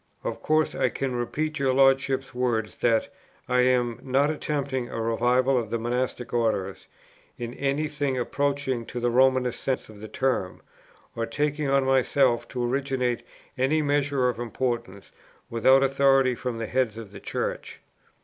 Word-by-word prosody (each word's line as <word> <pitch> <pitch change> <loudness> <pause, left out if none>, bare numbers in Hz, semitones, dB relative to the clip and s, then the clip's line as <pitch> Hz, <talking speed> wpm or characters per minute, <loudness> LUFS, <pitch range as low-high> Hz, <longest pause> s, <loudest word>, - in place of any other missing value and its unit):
Of - - -4
course 155 0 +2
I - - +1
can 130 -2 -3
repeat 155 +6 -2
your 135 -2 +1
Lordship's 135 0 +3
words 120 -4 -1
that 115 -2 +2 0.4
'I 125 0 +2
am 125 -2 +2
not 135 +3 +2
attempting 140 -5 -2
a - - -5
revival 125 +3 +2
of 115 -3 -5
the 115 - -1
Monastic 125 +1 -2
Orders, 110 -5 -1 0.5
in 120 0 -5
any 140 +3 -1
thing 145 -3 -2
approaching 140 -1 -1
to 125 - -5
the 120 0 0
Romanist 130 0 +2
sense 130 -4 -2
of 105 -1 -13
the 110 - -7
term,' 125 -8 -2 0.5
or 115 0 -2
'taking 145 +3 -1
on 135 0 +3
myself 130 -2 +2
to 125 -2 -3
originate 125 -2 -1 0.4
any 150 +4 +2
measure 145 -2 +1
of 125 -2 -2
importance 120 -4 -3 0.4
without 130 +4 +5
authority 135 -1 +3
from 120 -1 -4
the 115 - -3
Heads 120 -2 0
of 110 -3 -9
the 100 - -10
Church.' - - -4
130 Hz, 160 wpm, -26 LUFS, 120-135 Hz, 0.5 s, without